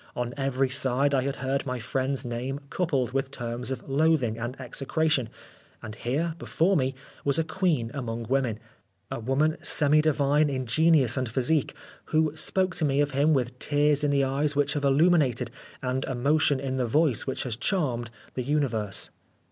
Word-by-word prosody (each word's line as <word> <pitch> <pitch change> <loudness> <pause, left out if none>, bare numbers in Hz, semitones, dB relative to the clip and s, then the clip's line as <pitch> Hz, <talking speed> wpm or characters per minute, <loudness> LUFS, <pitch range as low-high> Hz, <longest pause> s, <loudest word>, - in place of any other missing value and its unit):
On 120 0 -3
every 135 -1 0
side 135 +1 +1
I 135 - +3
had 140 +2 -2
heard 135 +1 -2
my 125 0 -2
friend's 130 +3 -2
name 125 +3 -3
coupled 140 -9 0
with 135 0 -1
terms 120 -2 -5
of 130 -2 -5
loathing 140 -5 +2
and 120 +3 -5
execration, 135 0 0 0.5
and 110 - -6
here, 140 +9 -2
before 185 +5 +1
me, 130 -4 0 0.3
was 140 -1 +1
a 165 - +2
queen 160 -8 0
among 120 -4 -4
women, 125 -2 0 0.5
a - - -3
woman 135 +7 +1
semi 150 +1 +3
divine 150 0 +2
in 130 -2 -2
genius 140 -1 +3
and 130 -3 -1
physique, 135 +5 +1 0.3
who 155 -1 +1
spoke 185 +3 +1
to 155 - +1
me 140 -1 +1
of 145 0 +2
him 140 +4 +2
with 125 -1 -2
tears 145 0 +2
in 145 - +2
the 140 -1 +2
eyes 140 +2 0
which 145 0 +1
have 145 -2 -1
illuminated, 140 -5 +3 0.3
and 130 +1 -1
emotion 140 +2 +2
in 130 -1 -3
the 125 -2 0
voice 145 -1 +2
which 135 - -2
has 125 -4 -3
charmed 125 - -1 0.2
the 130 - -2
universe. 120 -8 -1
135 Hz, 175 wpm, -27 LUFS, 125-150 Hz, 0.5 s, I